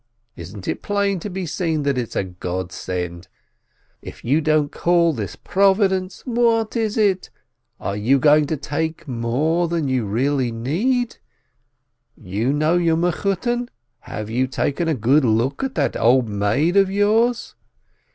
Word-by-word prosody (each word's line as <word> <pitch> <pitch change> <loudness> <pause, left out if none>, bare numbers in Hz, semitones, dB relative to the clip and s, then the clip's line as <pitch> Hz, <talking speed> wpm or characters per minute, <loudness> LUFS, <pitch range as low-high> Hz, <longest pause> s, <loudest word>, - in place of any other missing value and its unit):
Isn't 90 +3 -9
it - - -2
plain 200 -2 0
to 205 - -6
be 190 -1 -4
seen 160 -2 -1
that 140 -1 +1
it's 125 -3 -4
a - - +1
godsend? 90 -1 -5 0.7
If - - -11
you 145 +7 +2
don't 155 -1 +1
call 170 -1 +2
this 100 -7 -5
Providence, 190 - +1
what 230 -3 +1
is? 220 -2 -1 0.8
Are 100 - -3
you 115 +7 +2
going 150 +1 +4
to 155 - -2
take 160 +3 -3
more 135 +8 0
than 165 -3 -1
you 130 -5 0
really 130 +4 0
need? 210 - -1 1.0
You 105 +6 -2
know 155 +4 +2
your 165 -2 +2
Mechutton? 200 +8 -1 0.3
Have 105 -3 -7
you 130 +3 +1
taken 145 +5 -1
a 160 - +1
good 130 +6 +3
look 120 - +1
at 265 -1 -3
that - - 0
old 120 +1 +3
maid 110 - +1
of 195 -1 +5
yours? 220 +4 +1
150 Hz, 145 wpm, -21 LUFS, 115-190 Hz, 1.0 s, of